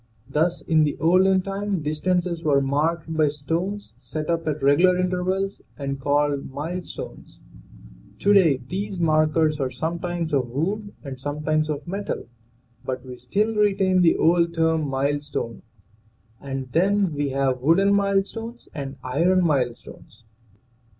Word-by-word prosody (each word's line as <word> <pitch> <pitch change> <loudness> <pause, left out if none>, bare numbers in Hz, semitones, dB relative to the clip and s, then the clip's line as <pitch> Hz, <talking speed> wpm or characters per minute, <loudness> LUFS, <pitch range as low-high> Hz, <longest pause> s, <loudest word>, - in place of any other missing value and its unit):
Thus 160 +5 0
in 160 -1 +3
the 145 -2 0
olden 185 +3 +4
time 195 -3 -2
distances 170 +3 -1
were 145 -4 +3
marked 155 +4 -1
by 155 -1 +3
stones 165 +8 -3
set 155 +1 -4
up 165 -1 -1
at 150 -2 -2
regular 175 +7 +5
intervals 185 +2 -1 0.2
and 140 -1 -4
called 145 0 +1
milestones; 165 +6 -7 0.8
to 205 - +3
day 170 -9 +5
these 195 +2 -4
markers 155 -1 +2
are 135 -2 0
sometimes 165 +4 -3
of 130 -4 +1
wood 200 - -2
and 135 -3 -7
sometimes 150 +2 -1
of 150 +1 -4
metal, 200 - -4 0.6
but 130 0 -4
we 125 -1 -8
still 200 - 0
retain 195 -3 +3
the 170 -2 +5
old 170 0 +3
term, 160 -2 +1
milestone, 140 -3 -2 0.8
and 135 -2 -5
then 190 +2 +2
we 145 -1 -1
have 135 -2 0
wooden 190 +8 +4
milestones 200 +4 -1
and 135 -2 -5
iron 170 +8 +2
milestones. 125 -6 -3
160 Hz, 135 wpm, -24 LUFS, 145-185 Hz, 0.8 s, regular